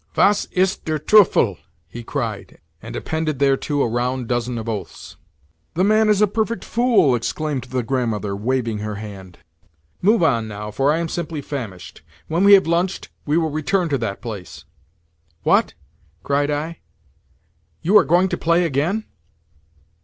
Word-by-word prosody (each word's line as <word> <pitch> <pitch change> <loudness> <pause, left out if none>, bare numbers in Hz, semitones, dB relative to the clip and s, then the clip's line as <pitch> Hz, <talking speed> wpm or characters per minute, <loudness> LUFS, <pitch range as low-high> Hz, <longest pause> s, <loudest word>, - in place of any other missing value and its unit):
"Was 205 0 +3
ist 190 +1 0
der 155 -1 0
Teufel!" 200 +6 +4 0.3
he 120 - -8
cried, 115 -6 -4 0.2
and - - -8
appended 160 -2 -2
thereto 140 +1 +1
a - - +1
round 125 +1 -2
dozen 120 0 -1
of 115 0 -6
oaths. 105 -4 -6 0.6
"The 180 - +2
man 215 +2 +4
is 210 0 +4
a - - +5
perfect 220 +3 -2
fool!" 235 - +3
exclaimed 130 +3 -2
the 125 -1 -2
Grandmother, 110 -5 -2
waving 115 0 -1
her 105 0 -4
hand. 100 -4 -9 0.6
"Move 210 +1 +3
on 115 -8 +2
now, 105 0 -6
for 135 +7 +2
I 155 - +1
am 170 0 -2
simply 165 -1 -4
famished. 115 - -7 0.3
When 170 +4 0
we 200 0 +8
have 195 - +7
lunched 170 +3 -1 0.2
we 150 +2 +2
will 160 -2 0
return 170 +4 0
to 140 - +1
that 105 -4 -4
place." 100 - -8 0.8
"What?" - - +2 0.5
cried 145 +1 +1
I. 155 +3 -3 1.0
"You 190 +6 +2
are 210 - +8
going 175 +4 +3
to - - -2
play 170 +1 +2
_again? 165 +10 -1
145 Hz, 160 wpm, -21 LUFS, 115-175 Hz, 1.0 s, we